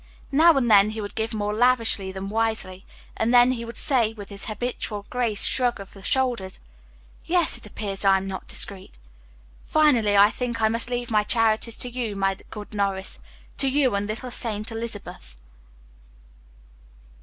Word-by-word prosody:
Now 320 Hz, +2 st, +6 dB
and 250 Hz, -3 st, +1 dB
then 200 Hz, 0 st, +7 dB
he 220 Hz, +1 st, -5 dB
would 205 Hz, -1 st, -5 dB
give 225 Hz, 0 st, -2 dB
more 210 Hz, -1 st, -2 dB
lavishly 230 Hz, -4 st, +2 dB
than 190 Hz, +1 st, -6 dB
wisely, 220 Hz, -4 st, -2 dB, 0.3 s
and 225 Hz, +1 st, +1 dB
then 245 Hz, 0 st, +6 dB
he 235 Hz, -2 st, -3 dB
would 230 Hz, -1 st, -8 dB
say, 235 Hz, -6 st, +2 dB
with 205 Hz, -3 st, -10 dB
his 200 Hz, -1 st, -9 dB
habitual 215 Hz, -2 st, -4 dB
graceful 235 Hz, -5 st, 0 dB
shrug 245 Hz, -3 st, +1 dB
of 195 Hz, -1 st, -10 dB
the 195 Hz, -, -13 dB
shoulders 240 Hz, -4 st, -1 dB, 0.7 s
"Yes, 345 Hz, -2 st, +1 dB
it 235 Hz, -3 st, -9 dB
appears 200 Hz, -1 st, -5 dB
I 195 Hz, -1 st, +5 dB
am 190 Hz, -, -4 dB
not 190 Hz, -1 st, -6 dB
discreet. 195 Hz, -2 st, -4 dB, 0.7 s
Finally, 245 Hz, -10 st, +3 dB
I 205 Hz, +2 st, +7 dB
think 240 Hz, -2 st, -3 dB
I 220 Hz, -1 st, +3 dB
must 230 Hz, +2 st, +1 dB
leave 245 Hz, -1 st, -3 dB
my 215 Hz, -1 st, +4 dB
charities 225 Hz, +1 st, +1 dB
to -, -, -2 dB
you, 235 Hz, -4 st, -3 dB
my 195 Hz, 0 st, 0 dB
good 210 Hz, -1 st, -9 dB
Norris 195 Hz, -2 st, -1 dB, 0.4 s
to 275 Hz, -, +1 dB
you 265 Hz, -2 st, +2 dB
and 200 Hz, 0 st, -1 dB
Little 235 Hz, +4 st, -5 dB
Saint 220 Hz, -2 st, -2 dB
Elizabeth." 205 Hz, -, -6 dB
220 Hz, 170 wpm, -24 LUFS, 200-245 Hz, 0.7 s, then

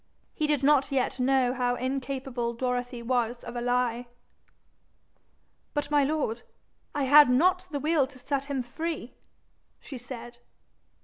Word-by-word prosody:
He 305 Hz, -, -1 dB
did 295 Hz, -3 st, +1 dB
not 280 Hz, -1 st, +4 dB
yet 260 Hz, -1 st, 0 dB
know 255 Hz, -1 st, +2 dB
how 245 Hz, -1 st, 0 dB
incapable 260 Hz, -2 st, -3 dB
Dorothy 245 Hz, 0 st, -2 dB
was 240 Hz, -1 st, -1 dB
of 240 Hz, -, -8 dB
a 240 Hz, -, -2 dB
lie. 245 Hz, 0 st, 0 dB, 1.7 s
'But, 290 Hz, 0 st, -2 dB
my 290 Hz, -1 st, +4 dB
lord, 275 Hz, -6 st, -1 dB, 0.5 s
I 290 Hz, -, 0 dB
had 290 Hz, +1 st, +8 dB
not 360 Hz, +8 st, +3 dB
the 290 Hz, -3 st, -3 dB
will 300 Hz, -2 st, +2 dB
to 275 Hz, -1 st, -15 dB
set 275 Hz, +2 st, -2 dB
him 275 Hz, -3 st, -2 dB
free,' 295 Hz, 0 st, -5 dB, 0.7 s
she 265 Hz, -4 st, -9 dB
said. 240 Hz, -1 st, -9 dB
260 Hz, 140 wpm, -28 LUFS, 245-285 Hz, 1.7 s, had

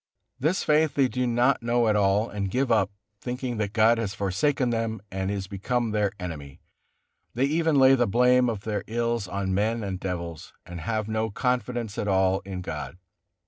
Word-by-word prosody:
This 160 Hz, +8 st, +1 dB
faith 150 Hz, 0 st, +2 dB
they 135 Hz, -2 st, +4 dB
do 125 Hz, 0 st, -1 dB
not 120 Hz, +3 st, +2 dB
know 120 Hz, 0 st, +1 dB
at 105 Hz, -, +3 dB
all, 100 Hz, +2 st, +2 dB
and 100 Hz, -3 st, -3 dB
give 130 Hz, +4 st, 0 dB
up, 105 Hz, -3 st, +3 dB, 0.3 s
thinking 125 Hz, -1 st, -4 dB
that 105 Hz, -2 st, -1 dB
God 115 Hz, +1 st, +4 dB
has 100 Hz, -3 st, -3 dB
forsaken 120 Hz, +7 st, 0 dB
them 115 Hz, -1 st, -2 dB
and 95 Hz, 0 st, -2 dB
is 100 Hz, -1 st, -2 dB
become 115 Hz, +5 st, -2 dB
their 105 Hz, -2 st, +1 dB
enemy; 75 Hz, -6 st, -7 dB, 0.8 s
they 130 Hz, +3 st, +2 dB
even 160 Hz, +2 st, +1 dB
lay 135 Hz, -1 st, +7 dB
the 125 Hz, -2 st, +3 dB
blame 125 Hz, +3 st, +4 dB
of 110 Hz, -4 st, -3 dB
their 105 Hz, -1 st, -3 dB
ills 115 Hz, -2 st, -1 dB
on 95 Hz, +1 st, -2 dB
men 110 Hz, +3 st, 0 dB
and 95 Hz, -2 st, -4 dB
devils, 85 Hz, -4 st, -5 dB
and 85 Hz, -1 st, -8 dB
have 110 Hz, +4 st, -2 dB
no 110 Hz, 0 st, -1 dB
confidence 120 Hz, -1 st, -2 dB
at 105 Hz, -, -2 dB
all 95 Hz, -1 st, +2 dB
in 95 Hz, -2 st, -5 dB
God. 90 Hz, -, -6 dB
110 Hz, 185 wpm, -26 LUFS, 95-125 Hz, 0.8 s, lay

